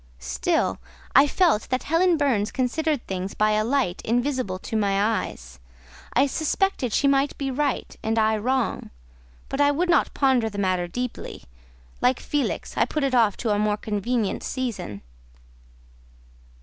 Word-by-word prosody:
Still - - -1 0.4
I 275 +2 +7
felt 320 - +2
that 255 0 -1
Helen 335 +2 +3
Burns 240 -8 +1
considered 285 +2 -1
things 190 0 -4
by 215 0 +2
a 215 0 +2
light 240 -7 0
invisible 245 -4 -1
to 205 - -6
my 200 -2 +1
eyes. 65 - -2 0.5
I 270 - +4
suspected 315 - 0
she 280 - +2
might 275 0 +2
be 275 -1 -2
right 280 0 -2
and 225 +1 -1
I 220 0 +3
wrong; 255 +3 -1 0.6
but 275 - -2
I 285 - +5
would 340 +5 0
not 340 - +3
ponder 260 -5 +2
the 205 - -9
matter 185 -3 0
deeply; 245 +7 -5 0.6
like 250 0 +3
Felix, 290 -1 -2
I - - +3
put 305 - -2
it 270 -1 0
off 225 -5 +3
to 230 - -1
a 205 - +1
more 210 0 +1
convenient 215 +1 -1
season. 235 - -4
245 Hz, 155 wpm, -24 LUFS, 210-280 Hz, 0.6 s, I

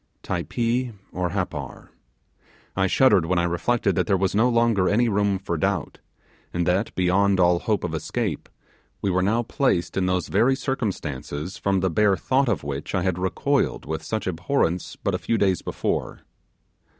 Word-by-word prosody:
Typee 120 +7 -1 0.2
or 90 0 -2
Happar? 85 -9 -4 0.9
I 95 0 +2
shuddered 100 -6 +4
when 90 +1 +1
I 85 - +2
reflected 85 +8 +1
that - - 0
there 100 -2 +3
was 95 0 0
no 115 +5 +3
longer 115 -5 +2
any 120 +3 +3
room 100 -2 +1
for 85 -3 -3
doubt; 95 0 -1 0.5
and 85 -1 -1
that, 95 +5 0
beyond 95 +2 +2
all 90 -1 +4
hope - - -1
of - - -3
escape, - - -3 0.5
we 100 - +1
were 90 +1 +2
now 110 +5 +1
placed 115 - 0
in 95 -1 +1
those 90 -1 0
very 120 +7 +3
circumstances 90 - -4
from 95 -1 +1
the 95 -1 +1
bare 100 +1 +3
thought 135 0 +1
of 100 -10 -1
which 70 +5 -4
I 95 - +1
had 90 -1 0
recoiled 95 -2 0
with 80 +1 -3
such 110 +7 -3
abhorrence 90 0 -1
but - - -2
a - - -1
few 115 - 0
days 95 -4 +2
before. - - -3
95 Hz, 175 wpm, -24 LUFS, 90-110 Hz, 0.9 s, shuddered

